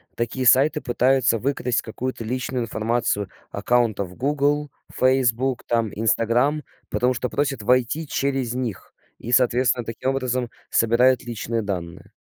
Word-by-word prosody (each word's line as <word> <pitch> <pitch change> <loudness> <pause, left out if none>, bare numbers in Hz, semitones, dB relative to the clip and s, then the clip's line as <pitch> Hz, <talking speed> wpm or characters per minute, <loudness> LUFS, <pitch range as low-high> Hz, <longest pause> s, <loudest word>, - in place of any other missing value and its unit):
такие 120 +2 -2
сайты 145 +5 +5
пытаются 125 -1 +2
выкрасть 125 -1 0
какую-то 120 +1 -5
личную 125 +1 -2
информацию 110 -3 -1 0.2
аккаунтов 105 -4 0
"Гугл", 145 +2 0 0.3
"Фейсбук" 130 -1 +2
там, 115 -3 0
"Инстаграм", 115 +7 +1 0.3
потому 125 +1 +1
что 125 0 -3
просят 140 -5 -1
войти 125 +7 +1
через 135 -4 -1
них 125 -6 -5 0.2
и, 120 - -7
соответственно, 125 -1 +3
таким 115 +3 -3
образом 130 -2 -1 0.2
собирают 120 +3 +3
личные 115 -1 -3
данные. 90 -5 -6
125 Hz, 120 wpm, -23 LUFS, 115-130 Hz, 0.3 s, сайты